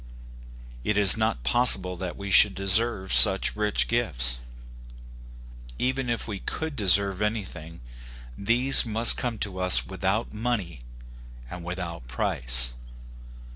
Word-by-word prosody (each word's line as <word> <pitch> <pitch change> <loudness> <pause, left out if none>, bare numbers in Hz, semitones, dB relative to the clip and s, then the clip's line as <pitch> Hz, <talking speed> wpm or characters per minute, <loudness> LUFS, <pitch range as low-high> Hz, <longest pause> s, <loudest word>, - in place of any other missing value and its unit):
It 105 +6 -2
is 100 -2 +6
not 110 - -3
possible 95 - +3
that 90 -1 -8
we 100 0 -8
should 100 +1 +5
deserve 100 +1 -1
such 95 -2 +6
rich 105 0 -2
gifts. 60 - -2 1.4
Even 130 0 -3
if 120 -1 -4
we 100 -3 -7
could 160 +7 -6
deserve 100 -1 +1
anything, 90 - -6 0.5
these 120 - +1
must 115 0 +2
come 120 -3 -5
to 95 -3 -5
us 90 -10 +5
without 100 - -4
money 105 - -5 0.7
and 90 -1 -9
without 85 -6 -8
price. - - -2
100 Hz, 120 wpm, -24 LUFS, 90-115 Hz, 1.4 s, is